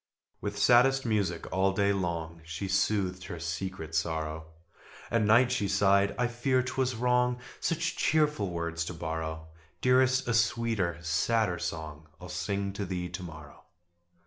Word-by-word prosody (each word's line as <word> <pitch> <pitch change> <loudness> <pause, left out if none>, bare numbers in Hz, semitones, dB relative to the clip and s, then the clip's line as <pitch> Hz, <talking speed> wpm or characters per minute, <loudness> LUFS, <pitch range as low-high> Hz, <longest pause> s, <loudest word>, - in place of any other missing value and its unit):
With 100 +1 -4
saddest 125 +5 +5
music 100 -7 0
all 95 +1 +2
day 100 +1 +2
long 85 -3 -3
She 80 +4 -5
soothed 95 -1 0
her 85 - -6
secret 85 0 -4
sorrow: 80 -1 -2 0.6
At 115 - +2
night 115 +4 +5
she 125 -5 0
sighed 100 0 +3
"I 125 - +2
fear 125 +2 +1
'twas 130 0 -1
wrong 125 +1 +2 0.2
Such 165 0 -1
cheerful 150 -10 +2
words 85 -1 -2
to 90 - -6
borrow. 80 -1 -4 0.3
Dearest, 130 0 +3
a 120 - +1
sweeter, 115 -6 +1
sadder 90 +3 +1
song 80 -2 -5
I'll 90 0 -10
sing 100 +4 -2
to 100 0 -3
thee 90 -1 -3
to 90 +2 -6
morrow." 80 -4 -10
95 Hz, 145 wpm, -29 LUFS, 85-115 Hz, 0.6 s, saddest